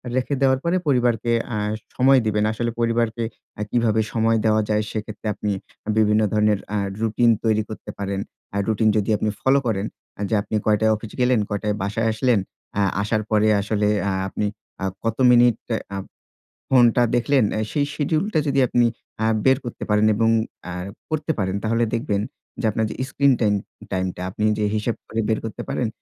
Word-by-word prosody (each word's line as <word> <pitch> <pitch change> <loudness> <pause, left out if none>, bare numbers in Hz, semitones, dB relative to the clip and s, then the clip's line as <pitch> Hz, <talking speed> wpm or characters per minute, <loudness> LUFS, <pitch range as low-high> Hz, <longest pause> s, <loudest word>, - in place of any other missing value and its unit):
রেখে 130 +2 0
দেওয়ার 130 -1 +4
পরে 170 +2 +1
পরিবারকে 120 -3 +2 0.2
আ - - -1 0.4
সময় 130 +1 +5
দিবেন। 105 -1 +1
আসলে 115 +1 -2
পরিবারকে 115 0 +1 0.3
অ্যা 105 - -3
কিভাবে 110 -2 +2
সময় 115 0 +2
দেওয়া 110 0 +4
যায়, 105 0 +2
সেক্ষেত্রে 110 0 -5
আপনি 105 - -2 0.5
বিভিন্ন 105 0 +4
ধরনের 105 -1 +3 0.2
আ - - +1 0.2
রুটিন 115 +2 +2
তৈরি 110 -1 +2
করতে 110 -1 -8
পারেন। 100 -1 -3 0.4
আ - - 0
রুটিন 110 0 +2
যদি 105 - 0
আপনি 110 - 0
ফলো 135 +1 +4
করেন, 100 -2 0 0.4
যে - - -2
আপনি 110 - -4
কয়টায় 110 +1 +3
অফিস 105 0 -8
গেলেন, 125 -1 +3
কয়টায় 105 0 -1
বাসায় 105 +3 -1
আসলেন। 120 0 +2 0.4
আ - - +3 0.2
আসার 110 +1 0
পরে 110 0 +4
আসলে 105 0 0 0.2
আ - - 0 0.2
আপনি 105 - -2 0.4
আ - - -1 0.2
কত 115 -1 -1
মিনিট 120 -2 +5 0.4
আ - - -2 0.7
ফোনটা 120 -2 +5
দেখলেন 130 +1 +3
অ্যা 110 - -1
সেই 145 -1 +1
শিডিউল 155 +4 0
টা 160 - +3
যদি 140 0 +2
আপনি 120 0 +3 0.4
আ - - +2 0.2
বের 130 -1 +5
করতে 120 - -6
পারেন। 105 +1 +3
এবং 115 +1 +2 0.4
আ - - -5 0.4
করতে 155 0 -1
পারেন 95 -1 -1
তাহলে 115 +2 +1
দেখবেন 115 -4 0 0.4
যে - - -2
আপনার 110 +1 0
যে - - -6
স্ক্রিন 140 0 +3
টাইম 105 -2 +3 0.4
টাইম 95 -1 0
টা - - -8
আপনি 105 +3 -2
যে 105 - 0
হিসাব 110 +2 -1
করে 115 - -3
বের 110 - +1
করতে 110 - -5
পারেন 120 - 0
110 Hz, 180 wpm, -22 LUFS, 105-120 Hz, 0.7 s, সময়